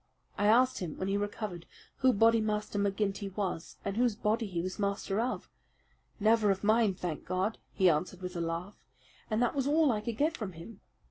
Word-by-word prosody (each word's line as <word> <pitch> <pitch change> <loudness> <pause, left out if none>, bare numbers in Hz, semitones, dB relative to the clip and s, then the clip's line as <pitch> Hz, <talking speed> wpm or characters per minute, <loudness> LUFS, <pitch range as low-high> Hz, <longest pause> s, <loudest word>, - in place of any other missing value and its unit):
I 205 - +1
asked 250 +4 +4
him 170 -5 -5
when 190 - -2
he 195 - +1
recovered 205 -3 -4 0.3
who 260 0 +4
Bodymaster 215 -2 +2
McGinty 200 -1 -1
was, 185 -5 -3
and 200 +1 -2
whose 240 -3 +2
body 220 +1 0
he 180 -3 -3
was 185 +3 -4
master 200 0 -1
of. 245 +2 -2 0.7
'Never 215 0 +4
of 195 0 0
mine, 215 -2 +3
thank 175 -4 -4
God!' 185 +4 -1
he 190 - +3
answered 180 +3 0
with 180 0 -5
a 170 - -2
laugh, 170 +4 -4 0.5
and 220 +2 +1
that 240 - +1
was 275 -1 0
all 300 -1 +4
I 215 -2 -1
could 225 0 -4
get 315 +3 +1
from 210 - -5
him. 180 +6 -11
205 Hz, 195 wpm, -31 LUFS, 185-225 Hz, 0.7 s, asked